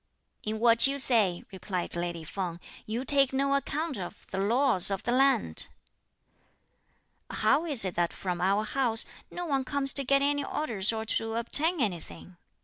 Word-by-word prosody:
"In 215 Hz, +1 st, -4 dB
what 230 Hz, +2 st, +4 dB
you 275 Hz, +1 st, -2 dB
say," 220 Hz, -10 st, 0 dB
replied 185 Hz, -2 st, -3 dB
lady 175 Hz, -1 st, -4 dB
Feng, 170 Hz, +1 st, -5 dB, 0.3 s
"you 235 Hz, +4 st, -4 dB
take 275 Hz, -1 st, +3 dB
no 275 Hz, +1 st, 0 dB
account 285 Hz, 0 st, -2 dB
of 180 Hz, -, -9 dB
the 190 Hz, -, -3 dB
laws 230 Hz, -1 st, +4 dB
of 195 Hz, -1 st, -3 dB
the 240 Hz, -, -1 dB
land." 270 Hz, +2 st, +1 dB, 1.6 s
"How 325 Hz, -, +1 dB
is 270 Hz, -10 st, +6 dB
it 185 Hz, -, -3 dB
that 175 Hz, -1 st, -1 dB
from 180 Hz, -2 st, -5 dB
our 200 Hz, +3 st, +1 dB
house, 235 Hz, -2 st, +3 dB, 0.2 s
no 355 Hz, -, -6 dB
one 275 Hz, -5 st, -1 dB
comes 275 Hz, +1 st, -2 dB
to 275 Hz, -, +3 dB
get 275 Hz, +1 st, +2 dB
any 285 Hz, 0 st, 0 dB
orders 220 Hz, -10 st, -1 dB
or 220 Hz, -1 st, -4 dB
to 225 Hz, 0 st, -1 dB
obtain 305 Hz, +9 st, +1 dB
anything?" 180 Hz, -4 st, -4 dB
230 Hz, 165 wpm, -28 LUFS, 190-275 Hz, 1.6 s, is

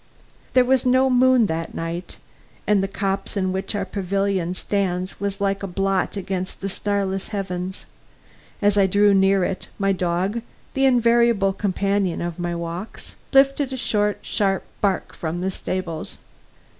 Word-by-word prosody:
There 255 Hz, -1 st, +5 dB
was 260 Hz, 0 st, +3 dB
no 260 Hz, +1 st, +4 dB
moon 255 Hz, -1 st, +5 dB
that 165 Hz, -2 st, -3 dB
night, 165 Hz, +2 st, -5 dB, 0.5 s
and 210 Hz, -2 st, +3 dB
the 195 Hz, -, 0 dB
copse 195 Hz, +1 st, -2 dB
in 185 Hz, -1 st, +1 dB
which 190 Hz, +2 st, -3 dB
our 200 Hz, -1 st, -1 dB
pavilion 195 Hz, -2 st, -1 dB
stands 185 Hz, -2 st, -2 dB
was 200 Hz, 0 st, -3 dB
like 195 Hz, 0 st, 0 dB
a 195 Hz, -, -3 dB
blot 195 Hz, +2 st, 0 dB
against 190 Hz, -1 st, -4 dB
the 195 Hz, -, -3 dB
starless 195 Hz, -1 st, -1 dB
heavens. 190 Hz, -2 st, -4 dB, 0.8 s
As 205 Hz, 0 st, +4 dB
I 195 Hz, -, +5 dB
drew 205 Hz, +2 st, +4 dB
near 195 Hz, 0 st, +4 dB
it, 185 Hz, -, -3 dB
my 195 Hz, 0 st, +2 dB
dog, 185 Hz, +4 st, 0 dB, 0.3 s
the 270 Hz, 0 st, +2 dB
invariable 235 Hz, -5 st, +4 dB
companion 195 Hz, -2 st, 0 dB
of 175 Hz, 0 st, -4 dB
my 175 Hz, 0 st, -2 dB
walks, 170 Hz, +4 st, -6 dB, 0.2 s
lifted 275 Hz, 0 st, +4 dB
a -, -, -3 dB
short, 210 Hz, -3 st, +1 dB
sharp 195 Hz, -2 st, 0 dB, 0.2 s
bark 195 Hz, -2 st, 0 dB
from 170 Hz, +1 st, -4 dB
the 190 Hz, +1 st, -1 dB
stables. 180 Hz, -4 st, -4 dB
195 Hz, 155 wpm, -23 LUFS, 185-205 Hz, 0.8 s, There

